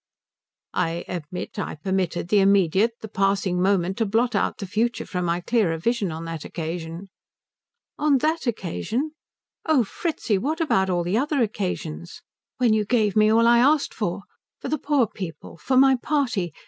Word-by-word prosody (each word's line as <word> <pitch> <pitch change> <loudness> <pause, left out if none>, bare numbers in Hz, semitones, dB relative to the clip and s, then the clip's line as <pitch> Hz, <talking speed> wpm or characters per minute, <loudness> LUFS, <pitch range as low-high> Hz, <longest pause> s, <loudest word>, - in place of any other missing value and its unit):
"I 170 -1 -1
admit 180 0 -6
I - - -3
permitted 180 +1 -2
the 210 - +4
immediate, 195 +2 +3
the 220 - -6
passing, 195 -3 0
moment 190 +1 +1
to 225 - +2
blot 235 +4 +1
out - - 0
the 200 - -5
future 225 +4 -1
from 180 -2 -3
my 170 +1 0
clearer 185 -5 +1
vision 210 +1 0
on 160 +1 -6
that 165 -2 -5
occasion." 165 +2 -6 0.9
"On 295 -2 +4
that 310 +2 -1
occasion? 235 - -2 0.5
Oh 310 -6 +3
Fritzi. 225 - -2
What 305 - -2
about 190 - +2
all 175 -1 +1
the 180 +5 0
other 285 -1 +1
occasions? 180 - -4 0.3
When 245 -3 +3
you 215 -1 +2
gave 210 -2 +1
me 215 0 +5
all 230 +1 +4
I 235 0 +6
asked 285 +4 +3
for - - -3 0.4
for - - -5
the 310 - -1
poor 285 -4 +2
people, 185 -6 -8
for 260 +8 0
my 265 0 +6
party. 245 - -1
205 Hz, 170 wpm, -24 LUFS, 180-245 Hz, 0.9 s, I